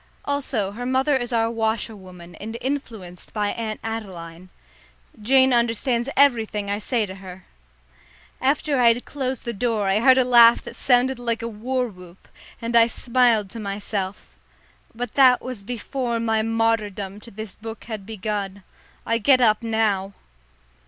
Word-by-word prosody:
Also 265 -8 -1
her 240 +4 -6
mother 265 +3 +2
is 245 -2 -2
our 230 -1 +1
washerwoman, 205 -6 -4
and 225 +2 -6
influenced 225 -10 -5
by 210 -2 0
Aunt 220 -1 -4
Adeline. 185 -6 -7 0.7
Jane 260 +3 +4
understands 235 +1 +1
everything 220 -7 +2
I 205 - -1
say 225 +1 0
to 190 - -8
her. 190 -1 -11 1.0
After 280 +1 +1
I 245 - +5
had 245 - -8
closed 265 -3 -4
the 235 - -2
door 220 -2 -1
I 195 +2 +2
heard 260 +3 +6
a 260 - +5
laugh 235 -1 +7
that - - -9
sounded 250 0 +2
like 230 -1 -2
a - - -2
war 250 +3 -2
whoop, 180 -3 -15 0.3
and 230 +1 -3
I 230 0 +7
smiled 235 -4 +2
to 230 - -6
myself. 200 -1 -4 0.6
But 245 -1 -5
that 255 -3 +6
was 255 -5 -7
before 240 +2 -3
my 225 -1 +1
martyrdom 215 -3 -1
to 220 - -12
this 215 -1 -7
book 225 0 -9
had 215 -4 -6
begun. 200 -2 -4 0.4
I 230 0 +1
get 255 +4 +5
up 215 -3 +3
now! 215 -4 0
225 Hz, 155 wpm, -23 LUFS, 205-245 Hz, 1.0 s, laugh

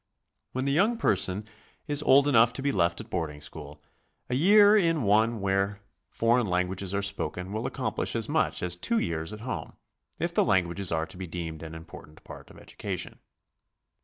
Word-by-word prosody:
When 130 +1 -2
the 140 - +1
young 205 +11 +2
person 100 - 0 0.4
is 145 -1 0
old 140 -1 +5
enough 120 -3 +5
to 135 - -4
be 140 - +1
left 85 -4 +1
at - - -10
boarding 80 -5 -3
school, 75 0 -9 0.5
a - - 0
year 205 +9 +6
in 165 - +2
one 110 +2 +2
where 100 +1 0 0.3
foreign 115 0 +2
lan 90 0 +1
guages 95 0 -4
are 100 - 0
spoken 90 -1 -3
will 110 - -2
accomplish - - -3
as - - -1
much - - 0
as 90 -1 0
two 230 - -1
years 80 - -2
at 105 0 -8
home, 105 -10 -5 0.4
if - - -2
the - - +3
languages 90 +1 +1
are 80 -1 0
to 90 - -11
be 95 -1 -6
deemed 80 -2 -6
an 80 0 -8
important 80 -1 -12
part - - -12
of - - -15
education. - - -6
100 Hz, 190 wpm, -27 LUFS, 85-130 Hz, 0.5 s, year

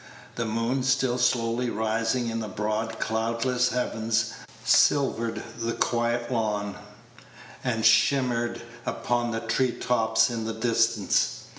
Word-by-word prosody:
The 115 - -3
moon, 115 +4 -1
still 130 -1 +1
slowly 120 0 +1
rising 115 +3 0
in 115 0 -2
the 110 - -4
broad, 110 +3 -3
cloudless 115 +3 0
heavens, 115 -2 -1 0.3
silvered 115 0 +3 0.2
the 115 0 -1
quiet 120 0 0
lawn, 105 -4 -1 0.9
and 115 -3 -1
shimmered 120 -4 +3 0.2
upon 120 0 -1
the 115 -1 -3
tree 120 +2 0
tops 110 -1 +2
in 115 -2 -3
the 115 - -3
distance. 115 -2 +1
115 Hz, 120 wpm, -26 LUFS, 110-120 Hz, 0.9 s, silvered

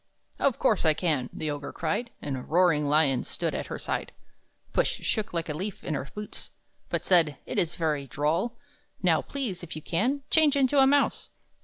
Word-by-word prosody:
"Of 275 -4 +2
course 215 - +2
I 155 -2 +4
can!" 145 -8 0
the 155 -1 -3
Ogre 145 -1 -5
cried, 170 +9 -2
And 140 -2 -2
a 130 - -4
roaring 165 -1 +3
lion 145 -3 +3
stood - - -2
at - - -3
her - - -4
side. - - -3 0.6
Puss - - +3
shook 215 -2 -2
like 170 -1 -2
a 150 - -2
leaf, 190 +6 -5
in 155 - -2
her 140 -1 -3
boots, 210 0 -6 0.4
But - - -2
said, 165 -6 +4
"It - - -1
is 170 0 +1
very 150 -4 -1
droll! 165 - 0 0.5
Now, 165 -3 +4
please, 250 -10 -4
if 175 -3 -7
you 155 - -6
can, 255 +11 0
change 310 -3 +5
into 275 0 +3
a 265 - +7
mouse!" 285 0 +2
170 Hz, 195 wpm, -27 LUFS, 150-225 Hz, 0.6 s, a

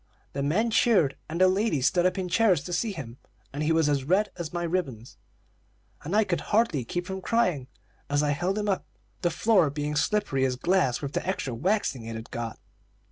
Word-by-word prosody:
The 140 - -2
men 195 +12 +1
cheered, 200 - +3
and 165 +2 -3
the 185 - +6
ladies 185 - +1
stood 175 +4 +3
up 185 +1 -2
in 185 -1 -2
chairs 185 -4 +3
to 175 - -6
see 225 +4 0
him, 135 -9 -8 0.3
and 145 - -4
he 155 +1 +1
was 160 -2 +3
as 140 -2 +1
red 190 +9 +2
as 170 -3 -5
my 175 0 -3
ribbons, 145 -10 -3 0.9
and 170 +7 -3
I 220 - +5
could 185 -4 -1
hardly 205 - +1
keep 175 +9 -4
from 190 +1 -5
crying, 180 - +1 0.4
as 145 +1 +2
I 145 - +2
held 175 +7 -1
him 210 0 -1
up, 195 -2 0 0.4
the 175 - +2
floor 185 -3 +3
being 150 +1 -3
slippery 150 -3 +1
as 130 -1 +1
glass 150 -3 +1
with 140 0 -4
the - - -1
extra 160 -9 -2
waxing 145 - 0
it 115 0 -6
had 110 +1 -8
got. 115 -1 -4
170 Hz, 210 wpm, -27 LUFS, 140-190 Hz, 0.9 s, the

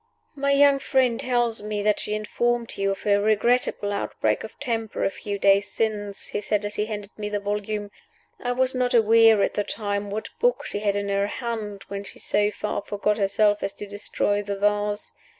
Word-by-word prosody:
"My 280 -1 0
young 280 0 +5
friend 260 -3 +2
tells 240 -3 +1
me 210 -1 -3
that 210 0 +2
she 210 - -3
informed 235 +2 -1
you 195 0 0
of 195 - -3
her 205 -1 +3
regrettable 215 -1 +1
outbreak 200 - -1
of - - -10
temper 225 -5 -2
a - - +1
few 200 +1 -5
days 200 +1 +3
since," 205 -3 -2
he 205 - -2
said 210 0 0
as 205 - -4
he 210 0 -1
handed 205 -2 -6
me 210 0 -3
the 205 0 -1
volume. 205 0 -3 0.5
"I 245 0 -1
was 260 +1 +1
not 250 -1 +1
aware 225 -1 +6
at - - 0
the 205 - 0
time 205 -1 -3
what 215 +2 -4
book - - +2
she 205 - -3
had 205 -1 0
in 205 0 -2
her 200 0 +1
hand 215 -4 -4
when 200 0 -5
she - - -11
so 205 0 +1
far 210 0 -3
forgot 205 +1 -1
herself 205 +1 +3
as 195 0 -2
to - - -7
destroy 205 0 -1
the 200 0 -3
vase. 205 0 0
210 Hz, 205 wpm, -25 LUFS, 205-230 Hz, 0.5 s, aware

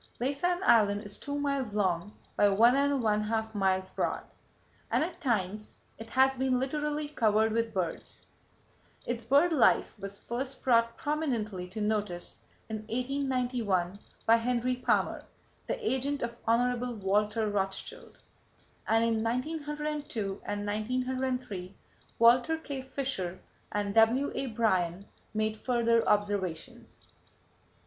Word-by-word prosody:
Laysan 295 +9 0
Island 205 - +4
is 205 0 -5
two 285 - -4
miles 280 -7 -1
long 190 0 0 0.2
by 205 - +5
one 230 +6 +5
and 280 -2 +2
one 210 -1 +2
half 220 +1 -2
miles 190 -2 +1
broad, - - -1 0.7
and - - +2
at 350 +2 -6
times 215 - -2 0.2
it 225 0 -9
has 265 +2 +3
been 260 -1 +1
literally 295 +2 -2
covered 220 -5 +2
with 230 0 0
birds. 185 -5 -4 0.8
Its 240 -1 -3
bird 285 +8 +4
life 275 - +4
was 200 0 -6
first 260 +5 -5
brought 230 -2 +3
prominently 235 - -2
to 195 +5 -7
notice 210 -5 -2 0.3
in 220 - -3
1891, 245 -5 -1 0.3
by 230 +1 +6
Henry 245 +1 0
Palmer, 250 - 0 0.4
the - - -1
agent 275 +1 0
of 235 0 -3
Hon. 245 +1 +1
Walter 210 +3 +1
Rothschild, 195 -2 -4 0.7
and 225 0 +3
in 225 -1 +1
1902 290 -4 -3
and 205 0 -3
1903 250 -2 -2 0.4
Walter 245 +7 +5
K. 280 -4 -5
Fisher 260 -9 -3 0.3
and 205 -1 -1
W.A. 245 +5 +3
Bryan 195 -5 0 0.3
made 215 0 0
further 230 -1 +2
observations. 205 -5 -2
230 Hz, 125 wpm, -30 LUFS, 205-265 Hz, 0.8 s, by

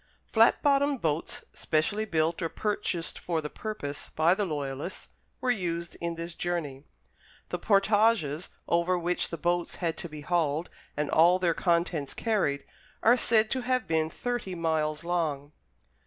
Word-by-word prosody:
Flat 225 +1 +4
bottomed 280 -1 +3
boats, 160 -3 -2
specially 170 +8 0
built 165 -3 0
or 165 - -1
purchased 205 -5 -2
for 170 -2 -1
the 150 -1 -5
purpose 180 -10 -5
by 160 +3 +3
the 205 +1 0
Loyalists, 145 +1 -4 0.3
were 255 -1 +1
used 170 -6 -2
in 170 0 -2
this 170 +1 -5
journey. 155 -6 -3 0.6
The - - -3
portages, 200 -6 +2 0.2
over 170 +2 +2
which 175 +1 -1
the 170 - -4
boats 175 0 0
had 165 -3 -2
to 170 - -4
be 150 -1 -8
hauled 160 0 0 0.3
and 150 -1 -1
all 170 +3 +6
their 175 -2 +2
contents 170 -4 0
carried, 195 -11 0 0.4
are 235 +2 +7
said 225 -2 +3
to 260 - 0
have 255 +1 0
been 160 -1 +1
thirty 240 -3 -3
miles 160 -2 0
long. 155 -5 -1
170 Hz, 155 wpm, -28 LUFS, 155-205 Hz, 0.6 s, are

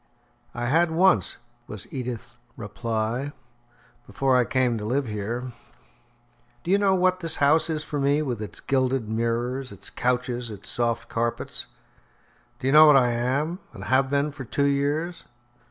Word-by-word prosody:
"I 120 - -2
had 165 +7 +3
once," 160 - +3 0.3
was 105 -2 -7
Edith's 120 -2 -5 0.2
reply, 115 +5 -3 0.7
"before 135 -1 +1
I 125 -1 +4
came 125 -2 +1
to - - -6
live 130 +6 0
here. 115 +4 -4 1.1
Do 175 - -2
you 200 - +4
know 195 -2 +3
what 185 0 +2
this 165 -2 +1
house 155 +3 +3
is 155 -1 -1
for 150 -2 -4
me, 140 +2 +2
with 120 -6 -3
its 105 - -7
gilded 130 -3 0
mirrors, 120 +4 -2
its - - -11
couches, 125 -1 -1
its 100 -2 -9
soft 115 -1 -1
carpets? 115 0 -3 0.9
Do - - -8
you 135 - +2
know 155 +1 +9
what 150 -2 +8
I 125 -2 +3
am, 135 +9 -1
and - - -9
have 130 +1 +2
been 140 +2 +1
for 140 -1 -8
two 140 +4 0
years?" 145 +5 -1
130 Hz, 160 wpm, -25 LUFS, 120-145 Hz, 1.1 s, know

